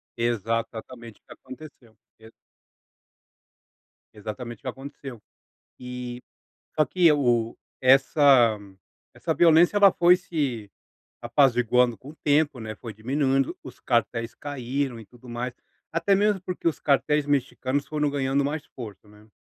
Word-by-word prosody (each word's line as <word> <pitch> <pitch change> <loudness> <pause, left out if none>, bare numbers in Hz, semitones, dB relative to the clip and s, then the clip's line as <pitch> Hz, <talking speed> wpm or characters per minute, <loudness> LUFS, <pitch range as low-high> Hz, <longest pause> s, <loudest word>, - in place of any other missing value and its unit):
Exatamente 115 0 -3
o - - -56
que - - -12
aconteceu. 130 -4 -14 0.2
Exa 110 0 -15 1.8
Exatamente 110 +3 -7
o - - -32
que 135 - -9
aconteceu. 135 -2 -8 0.6
E, 125 -1 -7 0.6
só 155 - +4
que 170 +3 +3
o 120 -5 +1 0.2
essa 130 -3 +5 0.6
essa - - -2
violência 170 +3 +5
ela 200 -2 +7
foi 175 +1 +5
se 140 - -3 0.5
apaziguando 125 -1 +2
com 135 - -13
o 155 - -12
tempo, 145 -3 +2
né, 110 -1 -6
foi 115 -3 -9
diminuindo 135 +4 0
os 130 - -11
cartéis 115 -1 -1
caíram 135 -2 -4
e 110 - -12
tudo 120 +3 -18
mais, 120 +1 -4 0.4
até 170 +4 +2
mesmo 205 0 +2
porque 180 -1 -4
os 165 - 0
cartéis 150 +1 +1
mexicanos 140 -1 -1
foram 150 -1 -1
ganhando 140 0 0
mais 150 +1 -3
força, 110 -5 -10
né. 105 +1 -19
130 Hz, 135 wpm, -25 LUFS, 120-145 Hz, 1.8 s, ela